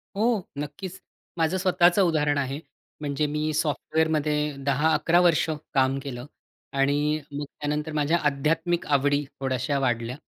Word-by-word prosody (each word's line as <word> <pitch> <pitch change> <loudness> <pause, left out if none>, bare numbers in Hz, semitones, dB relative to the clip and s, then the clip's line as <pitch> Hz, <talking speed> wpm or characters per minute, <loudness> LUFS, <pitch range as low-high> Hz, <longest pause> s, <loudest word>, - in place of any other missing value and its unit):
हो. 220 0 +2 0.2
नक्कीच. 150 +6 -6 0.4
माझं 165 +3 +1
स्वतःचं 180 0 +4
उदाहरण 150 -5 +2
आहे. 140 +1 -2 0.4
म्हणजे 145 0 -1
मी 155 +1 0
सॉफ्टवेअरमध्ये 150 -1 0
10-11 155 +4 +3
वर्ष 170 -2 +3 0.2
काम 135 0 +2
केलं 125 -3 -6 0.5
आणि 145 +2 +2
मग 145 +1 -4
त्यानंतर 150 +2 -4
माझ्या 150 +3 +2
आध्यात्मिक 165 +5 0
आवडी 145 +1 +2 0.2
थोड्याश्या 135 +1 -1
वाढल्या. 120 -2 -1
150 Hz, 125 wpm, -26 LUFS, 140-160 Hz, 0.5 s, स्वतःचं